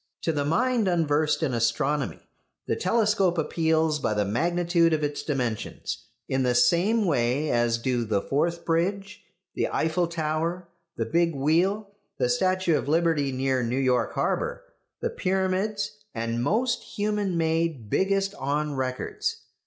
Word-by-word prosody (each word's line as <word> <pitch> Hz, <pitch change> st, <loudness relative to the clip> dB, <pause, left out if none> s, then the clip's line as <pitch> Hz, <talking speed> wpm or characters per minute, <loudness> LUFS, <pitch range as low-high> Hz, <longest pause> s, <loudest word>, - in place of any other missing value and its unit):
To 165 Hz, -, +1 dB
the 145 Hz, -1 st, 0 dB
mind 230 Hz, -, +1 dB
unversed 155 Hz, -3 st, +1 dB
in 140 Hz, -5 st, 0 dB
astronomy 120 Hz, +5 st, 0 dB, 0.4 s
the -, -, 0 dB
telescope 200 Hz, -3 st, +2 dB
appeals 160 Hz, -1 st, +1 dB
by 110 Hz, -6 st, -1 dB
the 105 Hz, -1 st, +1 dB
magnitude 170 Hz, -, +2 dB
of 155 Hz, -1 st, 0 dB
its 145 Hz, 0 st, -2 dB
dimensions, 125 Hz, -7 st, -3 dB, 0.2 s
in 130 Hz, -, 0 dB
the 125 Hz, -1 st, +1 dB
same 175 Hz, -, +3 dB
way 140 Hz, -1 st, +1 dB
as 120 Hz, -1 st, +2 dB
do 120 Hz, 0 st, -1 dB
the 105 Hz, -3 st, 0 dB
Forth 170 Hz, +9 st, -1 dB
Bridge, 195 Hz, +5 st, -1 dB, 0.3 s
the -, -, 0 dB
Eiffel 165 Hz, +2 st, 0 dB
Tower, 165 Hz, +2 st, -2 dB, 0.3 s
the 115 Hz, -, -1 dB
Big 165 Hz, +6 st, +1 dB
Wheel, 175 Hz, +9 st, +1 dB, 0.3 s
the 125 Hz, -, +1 dB
statue 185 Hz, +5 st, +2 dB
of 140 Hz, -, -2 dB
Liberty 160 Hz, -3 st, +2 dB
near 130 Hz, 0 st, 0 dB
New 120 Hz, +2 st, -1 dB
York 125 Hz, -3 st, +1 dB
harbour, -, -, -1 dB, 0.4 s
the -, -, -1 dB
Pyramids, 200 Hz, +3 st, -1 dB, 0.2 s
and 115 Hz, +1 st, -2 dB
most 240 Hz, -, +1 dB
human 205 Hz, -3 st, -2 dB
made 160 Hz, -6 st, 0 dB
"biggest 195 Hz, +1 st, +1 dB
on 145 Hz, -1 st, -2 dB
records." 130 Hz, -1 st, -3 dB
160 Hz, 145 wpm, -26 LUFS, 130-185 Hz, 0.4 s, same